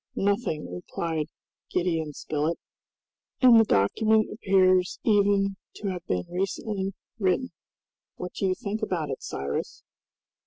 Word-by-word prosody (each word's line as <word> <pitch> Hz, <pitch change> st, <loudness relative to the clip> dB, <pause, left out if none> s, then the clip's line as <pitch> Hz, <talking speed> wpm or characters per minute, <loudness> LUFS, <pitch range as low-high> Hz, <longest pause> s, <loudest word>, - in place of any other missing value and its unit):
"Nothing," 195 Hz, -, -1 dB
replied 155 Hz, -, -3 dB, 0.4 s
Gideon 165 Hz, -4 st, 0 dB
Spilett, 155 Hz, +3 st, -1 dB, 0.8 s
"and 245 Hz, -3 st, +8 dB
the -, -, +7 dB
document 215 Hz, -, +3 dB
appears 185 Hz, -3 st, +3 dB
even 200 Hz, -2 st, +3 dB, 0.2 s
to 200 Hz, -, -3 dB
have 180 Hz, -2 st, -4 dB
been 90 Hz, -1 st, -1 dB
recently 195 Hz, +1 st, -2 dB, 0.2 s
written. 195 Hz, +6 st, +1 dB, 0.6 s
What 180 Hz, 0 st, -6 dB
do 195 Hz, -, -1 dB
you 185 Hz, -, +1 dB
think 210 Hz, +3 st, -4 dB
about 170 Hz, -9 st, -1 dB
it, 130 Hz, -, -5 dB
Cyrus?" 70 Hz, +1 st, -4 dB
185 Hz, 120 wpm, -27 LUFS, 160-205 Hz, 0.8 s, and